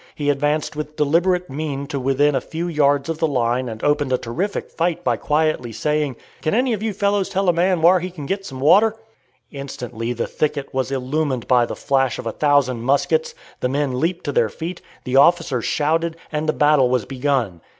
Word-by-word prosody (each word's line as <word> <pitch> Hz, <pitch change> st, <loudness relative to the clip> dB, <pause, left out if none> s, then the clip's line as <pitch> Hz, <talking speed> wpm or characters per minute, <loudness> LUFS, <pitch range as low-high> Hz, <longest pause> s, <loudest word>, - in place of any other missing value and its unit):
He 145 Hz, -1 st, +1 dB
advanced 145 Hz, +2 st, -1 dB
with 150 Hz, 0 st, -5 dB
deliberate 175 Hz, +5 st, +2 dB
mien 140 Hz, 0 st, -4 dB
to 140 Hz, 0 st, -4 dB
within 135 Hz, +3 st, +2 dB
a 130 Hz, -, 0 dB
few 165 Hz, +6 st, -4 dB
yards 145 Hz, -4 st, +2 dB
of 165 Hz, -1 st, -3 dB
the 160 Hz, -, +2 dB
line 125 Hz, -2 st, 0 dB
and 110 Hz, -1 st, -8 dB
opened 145 Hz, -2 st, +1 dB
a 130 Hz, -, +3 dB
terrific 175 Hz, -, -4 dB
fight 170 Hz, +1 st, -1 dB
by 120 Hz, -2 st, +2 dB
quietly 150 Hz, -2 st, 0 dB
saying, 150 Hz, +2 st, -1 dB, 0.3 s
"Can 155 Hz, -, 0 dB
any 250 Hz, +2 st, +2 dB
you 215 Hz, +1 st, -2 dB
fellows 200 Hz, 0 st, 0 dB
tell 195 Hz, 0 st, -1 dB
a 175 Hz, -, +5 dB
man 175 Hz, 0 st, +1 dB
whar 180 Hz, +2 st, +6 dB
he 180 Hz, +2 st, -4 dB
can 165 Hz, -5 st, -8 dB
git 195 Hz, +6 st, -2 dB
some 135 Hz, -8 st, -8 dB
water?" 205 Hz, +10 st, +5 dB, 0.6 s
Instantly 125 Hz, -4 st, -5 dB
the 120 Hz, -, -2 dB
thicket 145 Hz, -2 st, -2 dB
was 130 Hz, 0 st, -1 dB
illumined 135 Hz, -1 st, -2 dB
by 125 Hz, -2 st, +4 dB
the -, -, -5 dB
flash 135 Hz, -3 st, 0 dB
of -, -, -7 dB
a 115 Hz, -, -1 dB
thousand 140 Hz, -3 st, +2 dB
muskets, 470 Hz, -, +1 dB, 0.2 s
the 125 Hz, -, -1 dB
men 135 Hz, -2 st, -1 dB
leaped 170 Hz, +3 st, -1 dB
to 145 Hz, -, -2 dB
their 115 Hz, -5 st, +2 dB
feet, 165 Hz, -, -6 dB, 0.2 s
the 125 Hz, +1 st, 0 dB
officers 150 Hz, -5 st, +3 dB
shouted, 160 Hz, +2 st, 0 dB
and 155 Hz, 0 st, -2 dB
the -, -, +2 dB
battle 145 Hz, -4 st, +4 dB
was 125 Hz, -5 st, 0 dB
begun. 130 Hz, -, -1 dB
145 Hz, 200 wpm, -21 LUFS, 130-165 Hz, 0.6 s, whar